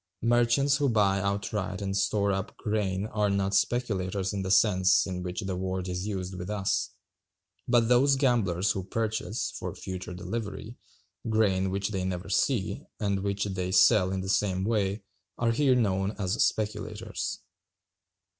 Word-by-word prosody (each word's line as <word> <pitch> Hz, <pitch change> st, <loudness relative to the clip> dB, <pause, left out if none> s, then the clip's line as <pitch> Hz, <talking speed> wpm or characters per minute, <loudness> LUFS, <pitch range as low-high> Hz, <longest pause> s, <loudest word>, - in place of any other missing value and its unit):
Merchants 120 Hz, +4 st, +3 dB
who 140 Hz, -1 st, +1 dB
buy 100 Hz, -4 st, +3 dB
outright 100 Hz, -1 st, -2 dB
and 100 Hz, -1 st, -3 dB
store 100 Hz, 0 st, +1 dB
up 95 Hz, +2 st, -3 dB
grain 105 Hz, -2 st, -1 dB
are 105 Hz, -1 st, 0 dB
not 100 Hz, 0 st, 0 dB
speculators 100 Hz, -6 st, 0 dB
in 100 Hz, -, -2 dB
the 95 Hz, -, -3 dB
sense 95 Hz, 0 st, +4 dB
in 90 Hz, -2 st, -4 dB
which 90 Hz, 0 st, -4 dB
the 95 Hz, -1 st, -3 dB
word 95 Hz, 0 st, -3 dB
is 90 Hz, +2 st, -3 dB
used 95 Hz, -2 st, -4 dB
with 90 Hz, +1 st, -6 dB
us; 100 Hz, -2 st, 0 dB, 0.8 s
but 120 Hz, -2 st, +3 dB
those 130 Hz, +3 st, +4 dB
gamblers 110 Hz, -9 st, +2 dB
who 95 Hz, -, -3 dB
purchase, 110 Hz, +1 st, -2 dB
"for -, -, -6 dB
future 95 Hz, -1 st, -6 dB
delivery," 110 Hz, +3 st, -5 dB, 0.5 s
grain 100 Hz, -4 st, +2 dB
which 95 Hz, +1 st, -2 dB
they 95 Hz, -3 st, -2 dB
never 90 Hz, -1 st, -4 dB
see, -, -, 0 dB, 0.2 s
and 100 Hz, -2 st, 0 dB
which 100 Hz, 0 st, -1 dB
they 95 Hz, -2 st, -3 dB
sell 95 Hz, +1 st, +5 dB
in 95 Hz, -1 st, -2 dB
the 95 Hz, -, -5 dB
same 95 Hz, -1 st, +1 dB
way, 100 Hz, -1 st, 0 dB, 0.3 s
are 115 Hz, -1 st, +1 dB
here 130 Hz, +1 st, +3 dB
known 100 Hz, -4 st, +1 dB
as 100 Hz, +2 st, +1 dB
speculators. 110 Hz, 0 st, -2 dB
100 Hz, 155 wpm, -28 LUFS, 95-110 Hz, 0.8 s, sell